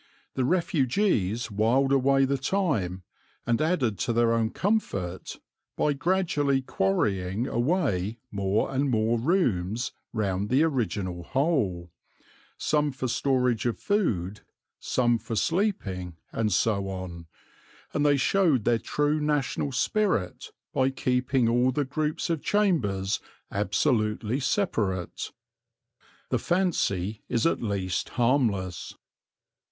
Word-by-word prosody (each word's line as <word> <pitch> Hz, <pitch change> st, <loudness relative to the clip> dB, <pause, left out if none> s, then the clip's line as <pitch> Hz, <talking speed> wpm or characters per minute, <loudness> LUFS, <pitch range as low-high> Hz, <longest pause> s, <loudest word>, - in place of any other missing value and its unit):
The 130 Hz, -, 0 dB
refugees 130 Hz, -, +1 dB
wiled 120 Hz, +7 st, +2 dB
away 135 Hz, 0 st, +4 dB
the 135 Hz, 0 st, 0 dB
time, 130 Hz, -, -1 dB, 0.4 s
and 115 Hz, +2 st, +1 dB
added 140 Hz, -, +1 dB
to 105 Hz, -, 0 dB
their 115 Hz, 0 st, +3 dB
own 115 Hz, -1 st, +1 dB
comfort 100 Hz, -, -2 dB, 0.4 s
by 150 Hz, -, +2 dB
gradually 145 Hz, -4 st, +1 dB
quarrying 95 Hz, 0 st, 0 dB
away 120 Hz, -, 0 dB
more 100 Hz, +5 st, 0 dB
and 135 Hz, +1 st, +1 dB
more 115 Hz, 0 st, +1 dB
rooms 120 Hz, -, 0 dB, 0.2 s
round 100 Hz, -2 st, -1 dB
the 135 Hz, +5 st, +4 dB
original 105 Hz, -, -1 dB
hole, 105 Hz, -, 0 dB, 0.7 s
some 150 Hz, -1 st, +1 dB
for 130 Hz, 0 st, -3 dB
storage 125 Hz, -2 st, +1 dB
of 120 Hz, -, -1 dB
food, 105 Hz, -, -1 dB, 0.4 s
some 120 Hz, -2 st, +1 dB
for 115 Hz, -, -5 dB
sleeping, 105 Hz, -, -1 dB, 0.2 s
and 110 Hz, -2 st, 0 dB
so 100 Hz, 0 st, +1 dB
on; 90 Hz, -3 st, -6 dB, 0.7 s
and 145 Hz, -, +1 dB
they 145 Hz, -1 st, +4 dB
showed 155 Hz, -, +2 dB
their 115 Hz, 0 st, +2 dB
true 150 Hz, +6 st, 0 dB
national 145 Hz, -1 st, 0 dB
spirit 135 Hz, -, 0 dB, 0.2 s
by 130 Hz, 0 st, +2 dB
keeping 130 Hz, -1 st, +1 dB
all 120 Hz, +2 st, +3 dB
the 145 Hz, +2 st, -1 dB
groups 155 Hz, +4 st, -2 dB
of 160 Hz, -3 st, -1 dB
chambers 110 Hz, -, +1 dB, 0.3 s
absolutely 110 Hz, +2 st, 0 dB
separate. 110 Hz, -, -1 dB, 1.0 s
The -, -, +1 dB
fancy 110 Hz, -, 0 dB
is 115 Hz, -, +1 dB
at 165 Hz, -, +2 dB
least 100 Hz, -5 st, -2 dB
harmless. 110 Hz, -, 0 dB
120 Hz, 115 wpm, -27 LUFS, 100-145 Hz, 1.0 s, away